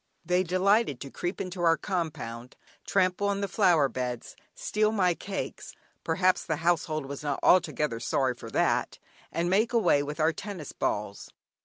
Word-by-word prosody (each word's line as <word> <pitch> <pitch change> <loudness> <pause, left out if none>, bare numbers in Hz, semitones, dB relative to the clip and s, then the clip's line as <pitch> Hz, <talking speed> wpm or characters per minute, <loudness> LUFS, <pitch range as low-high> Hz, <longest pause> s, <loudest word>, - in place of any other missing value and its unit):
They 180 +1 +2
delighted 185 - +2
to 135 - -7
creep 175 +2 -4
into 185 -1 -4
our 165 -1 +4
compound, 150 - -4 0.3
trample 190 +1 +2
on 200 0 0
the 200 - 0
flower 175 -7 +4
beds, 125 -1 -5 0.2
steal 215 0 +1
my 185 -5 +2
cakes 195 +3 -6 0.3
(perhaps 180 +2 +2
the 160 - -1
household 155 -3 +1
was 140 0 -6
not 145 -2 -2
altogether 150 -9 +3
sorry 130 +2 0
for 120 - -10
that), - - +1 0.3
and 170 +1 -1
make 210 +6 +2
away 175 -11 +4
with 150 +2 -5
our 160 +1 +3
tennis 180 -4 -7
balls. 105 -1 -3
170 Hz, 160 wpm, -28 LUFS, 145-190 Hz, 0.3 s, our